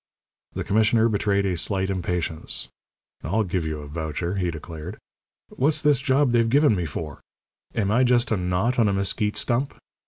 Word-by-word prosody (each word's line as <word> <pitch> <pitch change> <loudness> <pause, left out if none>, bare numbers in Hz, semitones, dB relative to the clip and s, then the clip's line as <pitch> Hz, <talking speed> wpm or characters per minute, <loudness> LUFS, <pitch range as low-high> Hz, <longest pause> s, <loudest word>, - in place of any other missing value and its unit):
The - - -3
commissioner 110 +2 +3
betrayed 100 -2 +1
a 95 -2 0
slight 95 +2 -1
impatience. 90 -3 -1 0.5
"I'll 100 +10 0
give 90 -4 -2
you 75 -1 -4
a 75 - -9
voucher," 80 +4 -3
he 90 -2 0
declared. 80 +3 -7 0.5
"What's 150 +3 +1
this 145 -3 +4
job 135 -1 +2
they've 115 -1 +3
given 140 -2 +4
me 90 -3 -2
for? 75 -1 -6 0.5
Am 100 -3 0
I 120 +4 +4
just 120 -1 +2
a - - +3
knot 90 +8 0
on 110 -3 +4
a - - 0
mesquite 100 +2 0
stump? 130 +3 -1
100 Hz, 175 wpm, -24 LUFS, 85-120 Hz, 0.5 s, this